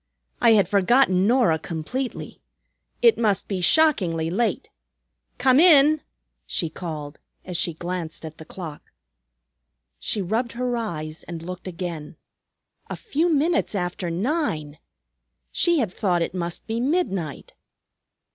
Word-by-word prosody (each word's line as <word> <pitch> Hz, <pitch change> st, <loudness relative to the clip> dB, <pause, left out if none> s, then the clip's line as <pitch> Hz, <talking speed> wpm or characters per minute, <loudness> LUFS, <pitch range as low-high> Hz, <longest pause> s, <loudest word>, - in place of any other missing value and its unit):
"I 235 Hz, -2 st, +6 dB
had 200 Hz, -4 st, +4 dB
forgotten 200 Hz, -1 st, +3 dB
Norah 230 Hz, -10 st, +3 dB
completely. 185 Hz, -, -5 dB, 0.6 s
It 465 Hz, -, +6 dB
must 210 Hz, -4 st, +1 dB
be 190 Hz, -3 st, -2 dB
shockingly 175 Hz, -, +3 dB
late. 230 Hz, +6 st, -1 dB, 0.7 s
Come 260 Hz, +1 st, +4 dB
in," 305 Hz, -3 st, +6 dB, 0.5 s
she 165 Hz, -, -1 dB
called, 155 Hz, -4 st, -6 dB, 0.3 s
as 180 Hz, -, -6 dB
she 170 Hz, -1 st, 0 dB
glanced 170 Hz, -1 st, -5 dB
at 155 Hz, 0 st, -9 dB
the -, -, -8 dB
clock. 160 Hz, -5 st, -9 dB, 1.1 s
She 215 Hz, -, -2 dB
rubbed 225 Hz, +6 st, -1 dB
her 245 Hz, 0 st, -1 dB
eyes 160 Hz, -9 st, -4 dB
and 165 Hz, -2 st, -7 dB
looked 180 Hz, +2 st, -7 dB
again. 170 Hz, -4 st, -6 dB, 0.7 s
A -, -, -3 dB
few 345 Hz, -5 st, 0 dB
minutes 320 Hz, -4 st, +1 dB
after 175 Hz, -1 st, -2 dB
nine! 170 Hz, -, -2 dB, 0.7 s
She 345 Hz, -1 st, +2 dB
had 220 Hz, -10 st, 0 dB
thought 175 Hz, -4 st, +1 dB
it -, -, -4 dB
must 175 Hz, -2 st, -4 dB
be 225 Hz, +1 st, -2 dB
midnight! 235 Hz, -, -2 dB
190 Hz, 130 wpm, -24 LUFS, 170-250 Hz, 1.1 s, I